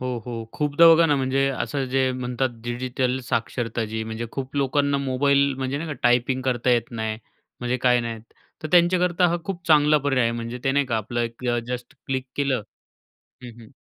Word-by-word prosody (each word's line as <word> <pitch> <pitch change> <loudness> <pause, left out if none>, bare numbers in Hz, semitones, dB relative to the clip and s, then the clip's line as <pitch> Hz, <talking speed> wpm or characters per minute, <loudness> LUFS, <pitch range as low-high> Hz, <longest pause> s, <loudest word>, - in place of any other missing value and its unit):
हो, 130 - -3 0.2
हो. 125 - -5 0.2
खूपदा 150 +2 +4
बघा 165 +1 +4
ना, 145 -2 +2
म्हणजे 135 +1 +1
असं 135 +1 -2
जे 130 0 +1
म्हणतात 125 +1 -2
डिजिटल 125 +1 -1
साक्षरता 115 -1 -2
जी 110 - -2
म्हणजे 110 +1 -5
खूप 135 0 -5
लोकांना 140 +1 +1
मोबाईल 140 +1 +2
म्हणजे 135 +1 -2
नाही 165 - -5
का, 150 - -3
टायपिंग 125 +2 +2
करता 125 -1 0
येत 120 -2 +1
नाही, 110 -2 -3 0.4
म्हणजे 125 +1 -1
काय 125 -1 +5
नाही. 115 -1 -5 0.4
तर 155 - -4
त्यांच्याकरता 180 0 +4
हा 170 - 0
खूप 175 -1 -6
चांगला 150 -1 +5
पर्याय 135 -3 +1
आहे. 115 - +1
म्हणजे 115 +1 -5
ते 135 - +2
नाही 140 0 +2
का, 120 -3 -1
आपलं 110 +2 -3
एक 115 +1 -4 0.2
जस्ट 125 -1 -5
क्लिक 130 -1 -2
केलं 135 -5 0 0.8
हं, 125 - -8
हं. 110 - -14
130 Hz, 190 wpm, -24 LUFS, 120-140 Hz, 0.8 s, काय